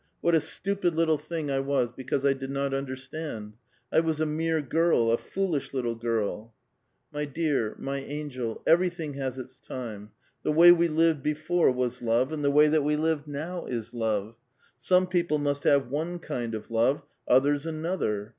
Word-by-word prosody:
What 170 - +1
a 160 - +5
stupid 195 -2 -1
little 160 -2 +2
thing 155 -1 -4
I 135 - +1
was 135 -3 0
be 130 +1 -10
cause 135 +1 -1
I 140 - +5
did 135 0 -7
not 140 0 -1
understand; 130 -4 -5 0.4
I - - +6
was 160 -2 0
a 155 - +2
mere 160 +1 0
girl, 150 -5 +2
a 115 - +3
foolish 180 -8 -2
lit 130 - 0
tle 120 -1 -1
girl." 115 -1 -3 0.6
My 150 0 -2
dear, 145 -6 -1
my 135 0 -3
angel, 135 -5 -5
everything 170 -3 +2
has 135 -2 -4
its 130 0 -9
time. 110 -5 -7 0.3
The 150 - 0
way 170 +3 +9
we 170 -1 +4
lived 160 -2 +2
before 155 +4 +1
was 125 -1 -2
love, 120 +5 +1
and 150 -2 -3
the 140 - +3
way 150 +2 +6
that 155 -1 +2
we 150 +1 +1
live 155 -1 0
now 160 +5 -5
is 115 -3 -4
love; 110 -1 -2 0.4
some 185 0 +3
people 175 -4 +1
must 145 -1 -2
have 140 -3 +3
one 165 +5 -2
kind 120 -9 -4
of 110 +1 -8
love, 115 +5 +2 0.2
others 145 +4 +3
another. 155 - -2
145 Hz, 185 wpm, -27 LUFS, 125-160 Hz, 0.6 s, way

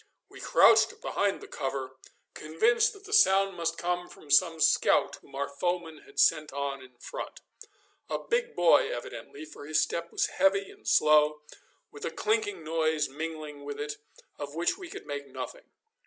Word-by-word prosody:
We - - -13
crouched - - +5
behind 200 -1 -1
the - - -10
cover, 135 -1 -4 0.4
convinced 220 +10 +2
that 400 -1 -15
the 420 +1 -8
sound 195 - +5
must 165 0 -2
come 175 0 -2
from 145 - -13
some 165 +2 +4
scout 145 -1 +3
whom 140 - -17
our 140 +1 -1
foemen 165 +1 -3
had - - -8
sent 155 -1 +3
on 140 -1 -3
in 125 -1 -16
front - - -7 0.7
a - - -1
big 475 0 -2
boy 470 -1 +4
evidently, 420 -7 -7
for 225 - -11
his 155 - +2
step 170 0 -2
was - - +1
heavy 195 0 +1
and - - -17
slow, 150 0 +4 0.5
with 145 - -11
a - - -1
clinking 210 -2 -1
noise 155 -2 0
mingling 155 0 -6
with 145 0 -6
it, 150 0 -4 0.4
of 145 +1 -6
which 170 - +1
we 375 -3 -10
could - - -9
make 145 -1 -5
nothing. - - -8
160 Hz, 170 wpm, -29 LUFS, 145-195 Hz, 0.7 s, crouched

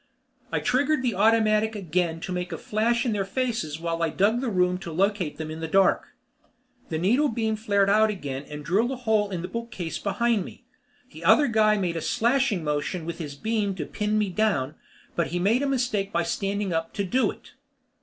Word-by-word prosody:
I - - +1
triggered 280 +2 +1
the 245 -3 +1
automatic 220 +1 +3
again 175 -3 -1
to 185 - -5
make 180 0 -3
a 165 - -3
flash 230 - 0
in 240 - +1
their 205 -2 0
faces 195 - -2
while 165 0 -2
I 165 - +2
dug 215 +8 +2
the 260 - -1
room 180 -2 +1
to 170 -3 -7
locate 190 -1 0
them 155 -1 -5
in 160 - -6
the 160 - -3
dark. 195 +3 +2 0.7
The 160 - -1
needle 235 - +3
beam 220 -1 -1
flared 205 -2 +1
out 215 +2 +4
again 145 -10 -4
and 150 0 -7
drilled 215 +7 +2
a 270 - -2
hole 220 -4 +1
in 180 -3 -4
the - - -3
bookcase 230 -8 -5
behind 210 +1 +1
me. - - -12 0.5
The - - -11
other 300 - +6
guy 215 -3 +3
made 175 -4 -1
a - - -3
slashing 235 - +1
motion 150 +3 -2
with 170 +1 -5
his 145 -4 -6
beam 210 +3 -1
to 155 -5 -4
pin 210 +5 -1
me 210 -3 0
down, 175 -9 0 0.4
but 170 - +1
he 175 - -3
made 210 +8 +2
a 285 - 0
mistake 235 -7 0
by 170 0 +1
standing 195 +2 -2
up 165 0 -2
to 200 - 0
do 250 +8 +1
it. - - -10
200 Hz, 210 wpm, -26 LUFS, 170-225 Hz, 0.7 s, other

